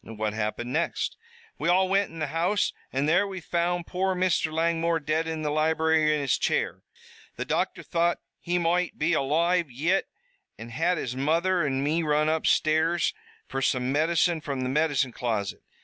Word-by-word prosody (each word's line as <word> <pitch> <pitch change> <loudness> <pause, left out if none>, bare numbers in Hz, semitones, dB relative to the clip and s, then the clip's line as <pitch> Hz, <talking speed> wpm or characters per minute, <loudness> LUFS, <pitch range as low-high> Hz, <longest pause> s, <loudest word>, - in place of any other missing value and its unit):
"What 110 -1 -4
happened 110 +3 -3
next?" 165 +2 -1 0.4
"We - - 0
all 185 +2 +4
wint 195 +1 +2
in 165 - -11
the 155 - -1
house, 180 +5 +1 0.2
an' 135 +2 0
there 180 +6 +3
we 190 -1 -6
found 175 0 -1
poor 190 +1 -1
Mr. 180 -3 +1
Langmore 165 +1 +1
dead 155 +2 -1
in 160 -1 -3
the 150 - -1
library, 160 0 +2
in 150 - -1
his 140 -4 +1
chair. - - 0 0.5
The - - -4
doctor - - -1
thought 170 0 +1 0.2
he 175 +1 -1
moight 175 +1 0
be 155 +3 +1
aloive 165 +4 +1
yit 160 +10 0 0.5
an' 115 +1 -9
had 165 +9 0
his 125 -4 -3
mother 165 +6 +1
an' 135 -2 0
me 155 +4 +1
run 150 -1 +2
upstairs 160 +1 +2 0.3
fer 135 - -3
some 125 -1 +1
medicine 165 +2 +2
from 140 -3 -4
the 130 - -1
medicine 145 -2 +1
closet. 110 -6 -3
160 Hz, 175 wpm, -26 LUFS, 140-170 Hz, 0.5 s, all